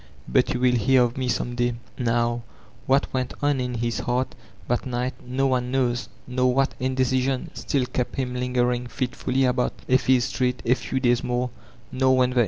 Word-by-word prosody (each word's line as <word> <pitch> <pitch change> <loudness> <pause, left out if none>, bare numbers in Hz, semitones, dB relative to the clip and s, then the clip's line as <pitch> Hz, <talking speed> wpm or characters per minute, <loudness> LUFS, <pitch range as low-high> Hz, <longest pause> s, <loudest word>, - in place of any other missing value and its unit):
But 130 -2 +2
you 125 - -1
will 125 0 +4
hear 125 +3 +4
of 120 -1 -1
me 130 -1 -2
some 120 0 -1
day.* 120 0 0 0.2
Now, 120 -1 0 0.5
what 135 +1 +2
went 130 -1 -2
on 145 -2 +2
in 125 -1 -2
his 120 -1 -1
heart 125 +1 -1 0.3
that 125 +1 0
night 125 +1 -1
no 130 +2 -1
one 125 -2 +1
knows; 125 -2 0 0.2
nor 125 0 +1
what 135 0 +2
indecision 130 0 0
still 135 -3 -1
kept 125 0 -3
him 130 -2 -2
lingering 125 -1 0
fit 125 +2 -3
fully 130 +1 +1
about 125 0 +1
Effie's 130 -1 +4
street 130 -2 -1
a 120 - +5
few 130 0 -2
days 120 -1 +2
more; 125 0 -1 0.4
nor 130 0 +3
when. 125 0 +3
125 Hz, 185 wpm, -24 LUFS, 120-130 Hz, 0.5 s, a